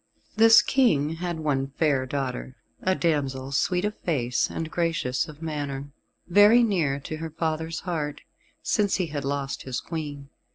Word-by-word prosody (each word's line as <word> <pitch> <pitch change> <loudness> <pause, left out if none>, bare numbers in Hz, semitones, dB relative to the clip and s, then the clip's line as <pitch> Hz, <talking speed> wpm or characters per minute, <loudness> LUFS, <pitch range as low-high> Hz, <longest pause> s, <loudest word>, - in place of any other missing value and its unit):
This 225 +1 +7
King 165 - +2
had 175 -1 -3
one 135 -3 0
fair 140 -5 +2
daughter, 130 -1 -4 0.3
a 185 0 +1
damsel 140 -6 -1
sweet 180 +6 +1
of 210 0 -2
face 125 -7 0
and 160 -1 -5
gracious 165 -7 0
of 155 +1 -11
manner, 145 -3 -4 0.4
very 205 +6 +6
near 165 -11 +1
to 155 +3 -6
her 160 +1 -5
father's 160 0 -3
heart, 150 -5 -3 0.4
since 205 -3 +1
he 185 - 0
had 145 -3 -4
lost 140 0 -3
his 130 -2 -4
Queen. 145 -4 -6
155 Hz, 155 wpm, -26 LUFS, 140-175 Hz, 0.4 s, This